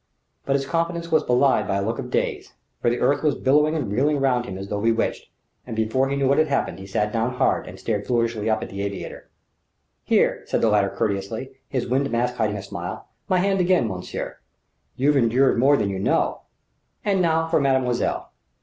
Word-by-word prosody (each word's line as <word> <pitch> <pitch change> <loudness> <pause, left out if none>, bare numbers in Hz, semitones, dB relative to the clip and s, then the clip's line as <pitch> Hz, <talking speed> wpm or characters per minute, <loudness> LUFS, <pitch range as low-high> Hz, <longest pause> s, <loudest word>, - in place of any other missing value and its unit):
But 135 - +2
his 135 0 0
confidence 170 +2 -2
was 160 - +4
belied 125 +2 +2
by - - 0
a 100 - 0
look 115 +2 -2
of - - -5
daze; - - -2 0.3
for - - +3
the 120 - 0
earth 140 +3 +2
was 150 -2 +2
billowing 150 +4 +3
and 140 -10 -2
reeling 145 +6 +2
round 125 -3 +1
him 95 -5 -6
as 95 +1 -6
though 100 0 -3
bewitched; 115 +1 0 0.4
and 115 - -5
before 110 +5 +1
he 140 - -1
knew 140 -1 +1
what 140 - +3
had 155 - +3
happened 140 -8 -1
he 95 - -9
sat 105 +2 -1
down 115 +2 0
hard - - +1
and - - -10
stared 105 -3 -2
foolishly 115 -3 0
up 110 - +1
at - - -7
the 100 0 -5
aviator. 100 0 -6 0.7
"Here!" - - +2
said - - 0
the 115 - +4
latter 105 -2 +3
courteously, 105 +7 -3 0.2
his 130 -3 -1
wind 135 +3 +1
mask 125 +1 -1
hiding 105 -2 0
a 100 - -6
smile 95 - -7 0.2
"my 185 - +3
hand 195 +1 +1
again, 180 -9 +3
monsieur. 90 -3 -5 0.6
You've 145 +3 +2
endured 125 +1 +3
more 140 +3 +5
than 100 - 0
you 95 - -3
know. - - +1 0.6
And 195 -2 +2
now 165 -1 +2
for 165 -2 +2
mademoiselle." 130 -3 0
125 Hz, 210 wpm, -23 LUFS, 110-140 Hz, 0.7 s, more